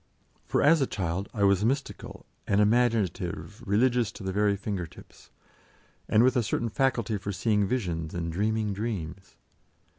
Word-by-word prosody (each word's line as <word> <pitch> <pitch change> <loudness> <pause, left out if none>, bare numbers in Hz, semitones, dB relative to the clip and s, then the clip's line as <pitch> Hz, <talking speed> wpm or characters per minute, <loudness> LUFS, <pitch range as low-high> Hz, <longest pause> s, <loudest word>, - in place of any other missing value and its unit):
For - - +1
as 155 +1 +5
a 135 - +2
child 95 0 -3
I 105 - -2
was 100 0 +4
mystical 135 +4 -3 0.2
and 100 - +2
imaginative 105 -4 +1
religious 120 +2 +2
to - - -10
the 95 - -2
very 105 +1 +2
finger 100 -3 -4
tips, - - -17 0.8
and 110 - +5
with 130 +2 +3
a 125 - +3
certain 115 +1 -1
faculty 115 -3 0
for 100 +2 -4
seeing 105 0 +1
visions 85 -10 -2
and 85 -1 -3
dreaming 105 +3 0
dreams. 95 -4 -5
105 Hz, 155 wpm, -27 LUFS, 95-115 Hz, 0.8 s, as